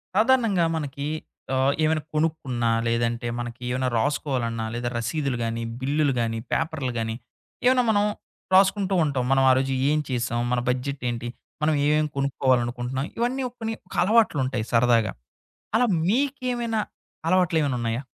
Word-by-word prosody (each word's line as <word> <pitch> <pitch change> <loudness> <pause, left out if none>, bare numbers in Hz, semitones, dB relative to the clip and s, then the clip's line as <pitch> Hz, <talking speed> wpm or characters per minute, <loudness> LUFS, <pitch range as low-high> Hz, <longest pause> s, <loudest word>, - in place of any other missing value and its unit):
సాధారణంగా 220 -6 +3
మనకి 140 -2 -4 0.5
ఆహ్, 130 +1 +3
ఏవన్న 155 0 +2
కొనుక్కున్నా, 140 -7 0 0.2
లేదంటే 115 +1 0
మనకి 120 +1 -6
ఏవన్న 130 +1 0
రాసుకోవాలన్నా, 115 -2 -1
లేదా 120 0 -2
రసీదులు 130 +3 -1
గాని, 115 0 -2 0.2
బిల్లులు 140 +2 +1
గాని, 115 -1 -1
పేపర్లు 160 -6 -1
గాని 115 0 -2 0.5
ఏమన్నా 250 0 +5
మనం. 205 -1 +3 0.5
రాసుకుంటూ 195 0 +4
ఉంటాం. 140 -4 0
మనం 135 0 +4
ఆ - - +7
రోజు 135 0 0 0.2
ఏం 150 +1 +2
చేసాం. 120 -2 -1
మన 125 - +2
బడ్జెట్ 130 +2 -2
ఏంటి? 120 0 -4 0.3
మనం 155 +1 +3
ఏమేమి 150 +1 +2
కొనుక్కోవాలనుకుంటున్నాం. 130 -1 0
ఇవన్నీ 245 +3 0 0.2
కొన్ని 225 0 -2
ఒక - - -10
అలవాట్లుంటయి 145 - +2
సరదాగా. 115 -2 +3 0.6
అలా 245 - +4 0.2
మీకేమైనా 245 -1 0 0.5
అలవాట్లేమన్నున్నాయా? 145 -9 +1
135 Hz, 130 wpm, -25 LUFS, 120-175 Hz, 0.6 s, ఆ